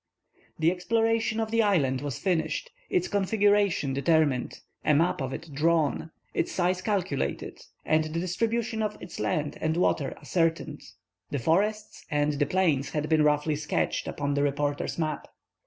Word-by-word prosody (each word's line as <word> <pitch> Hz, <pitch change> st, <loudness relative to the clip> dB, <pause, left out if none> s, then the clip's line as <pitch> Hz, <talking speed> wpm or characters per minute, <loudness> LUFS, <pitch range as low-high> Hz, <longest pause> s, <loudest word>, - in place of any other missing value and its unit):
The 160 Hz, +2 st, +3 dB
exploration 225 Hz, +4 st, +1 dB
of 220 Hz, -1 st, -2 dB
the 230 Hz, 0 st, +3 dB
island 145 Hz, -12 st, +2 dB
was 145 Hz, -4 st, -4 dB
finished, 190 Hz, -, -1 dB, 0.2 s
its 365 Hz, -2 st, +1 dB
configuration 205 Hz, -6 st, +2 dB
determined, 140 Hz, -2 st, +1 dB, 0.2 s
a 150 Hz, -, +3 dB
map 165 Hz, 0 st, +2 dB
of 130 Hz, -1 st, -2 dB
it 155 Hz, -, -7 dB
drawn, 160 Hz, +1 st, +1 dB, 0.2 s
its -, -, -1 dB
size 180 Hz, 0 st, 0 dB
calculated, 180 Hz, -, -2 dB, 0.3 s
and 155 Hz, 0 st, +2 dB
the 155 Hz, +2 st, -3 dB
distribution 225 Hz, +5 st, -1 dB
of 210 Hz, -1 st, -2 dB
its -, -, -9 dB
land 145 Hz, +8 st, -1 dB
and 160 Hz, +1 st, 0 dB
water 150 Hz, -6 st, +1 dB
ascertained. 165 Hz, -3 st, -1 dB, 0.5 s
The 145 Hz, -, -2 dB
forests 205 Hz, -, 0 dB
and 150 Hz, 0 st, +1 dB
the 145 Hz, 0 st, 0 dB
plains 155 Hz, -6 st, +1 dB
had 150 Hz, 0 st, -2 dB
been 160 Hz, -1 st, +4 dB
roughly 150 Hz, +1 st, +2 dB
sketched 150 Hz, 0 st, -1 dB
upon 145 Hz, 0 st, -2 dB
the 140 Hz, -, +1 dB
reporter's 145 Hz, 0 st, -1 dB
map. 155 Hz, -2 st, -2 dB
160 Hz, 155 wpm, -27 LUFS, 145-200 Hz, 0.5 s, been